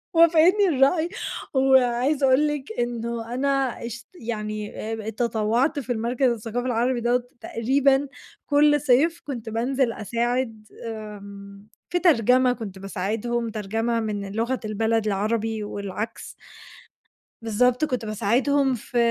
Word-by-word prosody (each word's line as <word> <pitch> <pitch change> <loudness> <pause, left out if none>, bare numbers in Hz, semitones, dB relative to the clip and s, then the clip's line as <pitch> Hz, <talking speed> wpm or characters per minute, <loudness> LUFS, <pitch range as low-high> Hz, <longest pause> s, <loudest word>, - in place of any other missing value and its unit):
وافِقتني 335 +5 +5
الرأي. 315 +4 +3 0.4
وعايزة 265 +1 +3
أقول 265 +3 +4
لِك 295 -5 -4
إنه 235 -1 -3
أنا 270 +2 0 0.4
اشت 235 0 -7
يعني 215 -2 -4 0.2
آآ 220 - -2
تطوّعت 235 +6 0
في 255 -2 -5
المركَز 240 +3 +1
الثقافي 235 +2 -3
العربي 245 +1 0
دَوّة 240 +1 +1 0.2
تقريبًا 270 +4 +2 0.4
كلّ 295 0 +4
صيف، 295 +6 +3
كنت 235 -6 -5
بانزِل 240 +2 0
أساعد 230 0 -2 0.2
آمم، 200 -2 -9 0.2
في 355 - 0
ترجمة، 255 - +4
كنت 200 -6 -8
باساعدهم، 220 +5 -2
ترجمة 225 +2 -1
من 205 -3 -3
لغة 235 +4 -1
البلد 220 +1 0
العربي 215 +2 -1
والعكْس. 205 +1 -5 1.1
بالضبط 245 +5 +2
كنت 250 -5 -3
باساعدهم 250 +6 +1
في 240 +1 -6
235 Hz, 115 wpm, -24 LUFS, 220-265 Hz, 1.1 s, وافِقتني